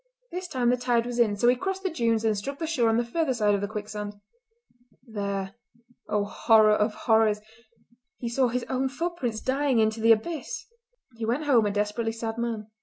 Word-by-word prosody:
This 360 +1 -4
time 245 -6 +1
the 250 - +2
tide 240 -1 +1
was 245 0 -4
in, 215 -3 +3
so 240 - +2
he 245 - +6
crossed 385 +8 -3
the 380 - -1
dunes 230 -6 +1
and 220 -1 +2
struck 275 +8 -5
the 325 - -3
shore 255 -8 +1
on 225 - +2
the 240 - +1
further 265 +2 0
side 210 -3 +2
of 200 - 0
the 205 - -1
quicksand. 210 -1 -6 0.9
There, 200 -4 -4 0.6
oh, 210 -1 +1
horror 215 0 +4
of 210 +1 +1
horrors! 220 -2 +4 0.8
he 240 - -5
saw 250 +2 +2
his 245 +1 -2
own 265 0 0
footprints 270 -7 -3
dying 270 -1 +1
into 220 0 +2
the 230 +1 +5
abyss! 295 +9 -1 0.5
He 225 - -3
went 250 +7 0
home 240 -7 +4
a - - 0
desperately 210 +3 -1
sad 225 0 -4
man. 225 -2 -3
230 Hz, 200 wpm, -26 LUFS, 215-255 Hz, 0.9 s, he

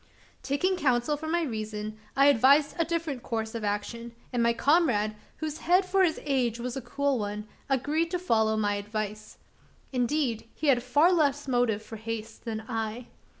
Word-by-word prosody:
Taking 365 +7 0
counsel 260 -1 +2
from 315 +2 -5
my 345 0 +2
reason, 215 -4 -4 0.2
I 275 - +5
advised 280 +2 +5
a 335 - +3
different 320 -6 -2
course 220 -1 -3
of 230 -2 -4
action; 220 +3 -3 0.2
and 240 - +1
my 235 0 +4
comrade 235 -6 +2 0.2
whose 310 -1 -4
head 365 +3 +3
for 380 +1 +3
his 330 -4 +1
age 250 -5 0
was 245 0 -4
a 270 - -3
cool 275 +2 0
one 210 0 -4 0.2
agreed 295 +5 +1
to 360 - -1
follow 220 -11 +2
my 205 -1 +1
advice. 215 +1 -5 0.6
Indeed, 245 -3 0
he 305 - 0
had 250 -3 +4
far 290 +8 +4
less 290 -4 +1
motive 245 -4 +1
for 225 - -8
haste 225 0 -6
than 220 -1 -4
I. 225 +2 -4
245 Hz, 175 wpm, -28 LUFS, 220-295 Hz, 0.6 s, I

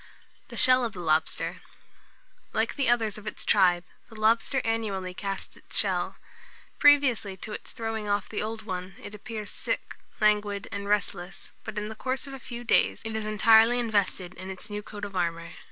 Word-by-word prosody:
THE - - -9
SHELL 255 0 +6
OF 225 - -3
THE 180 - -8
LOBSTER. 160 -2 0 0.9
Like - - +1
the 275 -4 +2
others 225 -3 +1
of 210 - -12
its 210 - -4
tribe, 175 -2 +4 0.3
the 220 -2 -11
lobster 230 +5 +3
annually 205 -5 -1
casts 195 +1 -5
its - - -2
shell. - - +1 0.6
Previously 270 -9 +5
to 215 - -6
its - - -7
throwing 225 -2 -4
off 205 -1 0
the 215 - -3
old 220 +1 -4
one, 185 -2 -5
it 205 - -8
appears 210 0 -6
sick, - - -3 0.2
languid, 210 -1 +2
and 200 -1 -4
restless, 190 -3 -2
but 210 - -7
in 210 0 -2
the - - -5
course 260 +3 -2
of 275 - -8
a 270 - -7
few 240 -1 -7
days 235 - +3
it 220 0 -4
is 215 -1 -2
entirely 225 +2 +6
invested 205 -6 0
in 185 +1 -8
its 190 +2 -7
new 205 0 -3
coat 205 0 -7
of 200 -1 -9
armour. 170 -2 -1
210 Hz, 185 wpm, -27 LUFS, 195-225 Hz, 0.9 s, SHELL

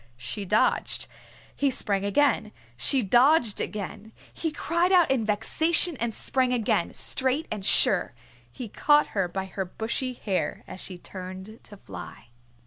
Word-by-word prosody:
She 125 - -4
dodged. 210 +4 +1 0.5
He 280 - +1
sprang 200 -6 -1
again. 215 +1 +1 0.2
She 245 - +2
dodged 240 - +3
again. 210 +1 -6 0.2
He 320 - -3
cried 340 +4 0
out 355 -5 +5
in 245 -5 +1
vexation 320 +10 +2
and 235 0 -2
sprang 255 +3 0
again, 230 -4 0
straight 265 +4 +2
and 210 -2 -4
sure. 190 -6 +3 0.4
He 235 - -7
caught 295 +7 +3
her 195 -3 +1
by 190 +2 -4
her 190 +1 -4
bushy 225 +7 -3
hair 200 -6 -3
as 185 - -10
she 185 - -8
turned 185 +4 -9
to 205 - -6
fly. 95 - -11
220 Hz, 145 wpm, -26 LUFS, 190-270 Hz, 0.5 s, out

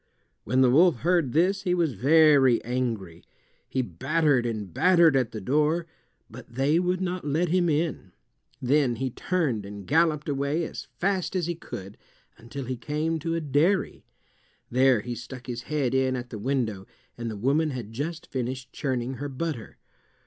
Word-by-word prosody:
When 130 +4 +2
the 125 -2 +5
wolf 160 -2 +4
heard 170 -5 +2
this 185 +7 +2
he 180 -2 +1
was 165 -6 +1
very 140 0 +5
angry. 115 -8 -3 0.5
He 130 - 0
battered 130 - +1
and 105 -6 -4
battered 170 - +5
at 130 -4 +1
the 110 - -5
door, 150 - +1 0.4
but 115 +1 -13
they 140 +5 +2
would 180 +1 0
not 180 0 -2
let 155 +4 0
him 175 0 +2
in. 150 - -1 0.5
Then 130 -1 +2
he 130 +2 -3
turned 145 - -1
and 100 0 -9
galloped 155 - +2
away 140 +3 0
as - - -7
fast 190 0 0
as 180 -3 0
he 175 - -1
could 100 - -9 0.4
until 120 +4 -8
he 130 0 -4
came 155 +6 -2
to 165 +2 -2
a 165 - -1
dairy. 155 +7 +1 0.7
There 130 -2 +4
he 120 +2 -5
stuck 120 +2 -9
his 120 -1 -5
head 145 -5 0
in 130 -1 +2
at 125 -1 -6
the 110 - -6
window, 110 -5 -2 0.3
and 115 -1 -4
the 110 - -5
woman 140 +8 +1
had 120 -6 -6
just 155 +6 -4
finished 130 0 -5
churning 130 -2 -2
her 145 0 -4
butter. 140 -3 -5
135 Hz, 170 wpm, -26 LUFS, 120-160 Hz, 0.7 s, the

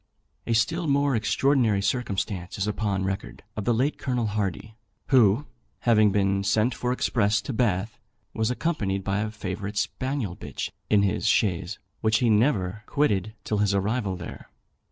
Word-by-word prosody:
A 115 - +1
still 165 +10 +1
more 140 -1 +2
extraordinary 115 -1 +2
circumstance 100 -6 -2
is 95 - 0
upon 105 -2 -1
record, 95 0 -4
of 105 - -4
the - - +3
late 130 +6 +1
Colonel 125 -3 -1
Hardy, 105 0 -3 0.3
who, 120 0 +4 0.4
having 110 -3 +4
been 100 0 +1
sent 110 +5 +2
for 125 +1 -2
express 105 -4 +1
to 135 - -4
Bath, 110 -3 0 0.3
was 110 0 0
accompanied 110 - -1
by 100 +1 0
a 110 +1 -1
favourite 100 -1 -5
spaniel 130 -9 -2
bitch - - -5 0.2
in 105 -1 +4
his 100 +2 0
chaise, 95 -2 +1 0.2
which 110 0 +2
he 120 -3 +2
never 105 -4 +2
quitted 110 -8 0
till 105 - -1
his 100 -1 +2
arrival 100 0 0
there. 90 -1 -9
105 Hz, 155 wpm, -26 LUFS, 100-120 Hz, 0.4 s, who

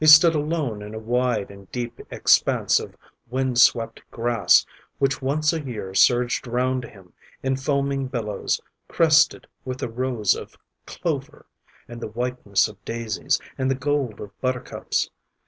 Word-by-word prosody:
He - - +4
stood 155 +2 +9
alone 150 -8 -1
in 105 +1 -8
a - - -4
wide 120 -2 0
and 100 -1 -15
deep 120 -1 -4
expanse - - +3
of - - -9 0.3
wind 130 -1 0
swept 115 -2 +4
grass 120 0 +3 0.3
which 135 +1 +1
once 150 +4 +1
a 160 - -2
year 110 -9 -6
surged 120 +4 +3
round 125 +1 0
him 95 -5 -16 0.3
in 135 0 +1
foaming 140 0 0
billows 110 -6 -2 0.3
crested 165 -1 +4 0.2
with 130 -1 -4
the 125 - -3
rose 115 -4 +1
of - - -9 0.3
clover, - - -4 0.4
and 120 0 -9
the - - -3
whiteness 120 -3 0
of 105 -2 -14
daisies, 115 -6 -1 0.2
and 130 0 +1
the 135 - +2
gold 135 -5 -1
of 105 - -8
buttercups. 130 -1 -2
125 Hz, 150 wpm, -24 LUFS, 110-135 Hz, 0.4 s, stood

